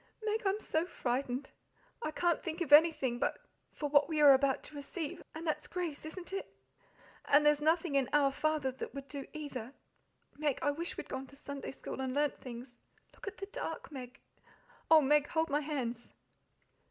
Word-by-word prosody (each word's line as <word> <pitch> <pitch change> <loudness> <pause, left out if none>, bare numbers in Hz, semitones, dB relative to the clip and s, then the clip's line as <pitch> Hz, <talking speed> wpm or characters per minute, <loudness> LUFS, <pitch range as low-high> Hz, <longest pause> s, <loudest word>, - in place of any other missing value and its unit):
"Meg, 435 +1 0
I'm 390 +2 +1
so 320 -6 0
frightened! 255 -4 -2 0.5
I 310 - -1
can't 340 +1 +1
think 325 +1 -4
of 310 -4 +2
anything 295 -6 +6
but - - 0 0.4
`For 295 - 0
what 290 +1 +5
we 315 -2 0
are 290 -2 +9
about 270 0 +2
to 300 - -12
receive,' 290 +2 -5
and 320 +2 -6
that's 305 -1 -1
grace, 340 -5 -4
isn't 360 +3 -8
it? 390 - -4 0.7
And 295 +1 +5
there's 295 0 +5
nothing 320 +1 +2
in 275 -2 +2
Our 285 -2 +4
Father 300 -1 0
that 260 - -7
would 275 0 -6
do 280 -2 -6
either. 275 -5 -6 0.7
Meg, 295 -3 +1
I 290 - +3
wish 335 +4 -5
we'd - - -5
gone 265 0 -5
to 280 - -16
Sunday 280 -1 -6
school 265 - -6
and 260 0 -2
learnt 290 0 +1
things. 245 0 -9 0.4
Look - - -12
at 405 - -5
the 395 - -5
dark, - - -5
Meg! 260 -2 -8 0.7
Oh, 320 -1 +9
Meg, 295 +1 +4
hold 320 -1 0
my 295 +1 +2
hands!" 250 -6 -4
295 Hz, 190 wpm, -33 LUFS, 270-315 Hz, 0.7 s, are